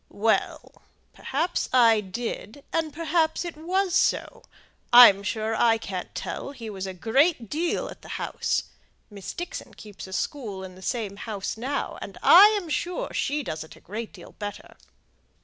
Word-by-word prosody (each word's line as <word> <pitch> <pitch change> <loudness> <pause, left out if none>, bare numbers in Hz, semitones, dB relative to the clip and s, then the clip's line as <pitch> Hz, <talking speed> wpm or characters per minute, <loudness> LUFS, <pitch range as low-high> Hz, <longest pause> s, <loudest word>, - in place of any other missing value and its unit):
"Well! 220 +2 -1 0.3
perhaps 325 +6 -2
I 230 -4 +5
did, 225 +5 -6
and 325 -2 0
perhaps 320 +2 0
it 340 - -6
was 360 +4 -1
so; 390 - +1 0.5
I'm 240 -5 +9
sure 220 +2 -2
I 225 0 +4
can't 190 -5 -6
tell; 275 - -5
he 230 -5 -8
was 195 -1 -5
a 190 - -5
great 240 - +1
deal 335 +3 -1
at - - -11
the - - -13
house. - - -1 0.5
Miss 200 -2 -7
Dixon 350 - -7
keeps 205 -3 -10
a 190 - -10
school 205 -5 -4
in 185 -1 -9
the 185 - -15
same 205 -1 -3
house 205 -3 -4
now, 265 +5 -3
and - - -8
I'm 405 +1 +7
sure 345 +3 -3
she 290 +1 -1
does 155 -9 -5
it 160 - -14
a - - -17
great 215 +4 -6
deal - - -13
better." 205 -1 -7
235 Hz, 165 wpm, -25 LUFS, 205-315 Hz, 0.5 s, I'm